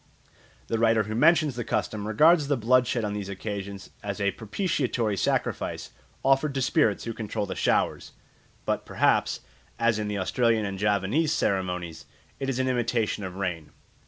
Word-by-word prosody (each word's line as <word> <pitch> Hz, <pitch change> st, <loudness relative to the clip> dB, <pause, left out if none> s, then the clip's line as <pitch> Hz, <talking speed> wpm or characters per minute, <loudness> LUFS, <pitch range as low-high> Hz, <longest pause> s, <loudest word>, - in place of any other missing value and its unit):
The 115 Hz, -, -2 dB
writer 115 Hz, -1 st, +4 dB
who 110 Hz, +1 st, -5 dB
mentions 150 Hz, +3 st, +4 dB
the 120 Hz, -, -3 dB
custom 105 Hz, -1 st, -2 dB
regards 150 Hz, +7 st, +5 dB
the 145 Hz, -1 st, +1 dB
blood 125 Hz, +2 st, +3 dB
shed 120 Hz, -3 st, -1 dB
on 105 Hz, -, -2 dB
these 100 Hz, -2 st, -4 dB
occasions 100 Hz, 0 st, -6 dB
as 100 Hz, 0 st, -4 dB
a 100 Hz, -1 st, +1 dB
propitiatory 120 Hz, -, -1 dB
sacrifice 95 Hz, -, -1 dB, 0.3 s
offered 135 Hz, +1 st, +3 dB
to 135 Hz, -, 0 dB
spirits 105 Hz, -4 st, +2 dB
who 115 Hz, -, -4 dB
control 105 Hz, -1 st, -3 dB
the 95 Hz, -, -4 dB
showers; -, -, 0 dB, 0.5 s
but -, -, -1 dB
perhaps, -, -, +1 dB, 0.4 s
as 115 Hz, -2 st, +2 dB
in 105 Hz, -, -2 dB
the 105 Hz, -1 st, -2 dB
Australian 115 Hz, +3 st, +1 dB
and 100 Hz, -1 st, -4 dB
Javanese 105 Hz, -, +1 dB
ceremonies, 90 Hz, -, -2 dB, 0.3 s
it 135 Hz, -, -2 dB
is 130 Hz, -, -1 dB
an 130 Hz, 0 st, 0 dB
imitation 115 Hz, -4 st, 0 dB
of 95 Hz, -1 st, -6 dB
rain. 90 Hz, -5 st, -3 dB
110 Hz, 165 wpm, -26 LUFS, 100-125 Hz, 0.5 s, regards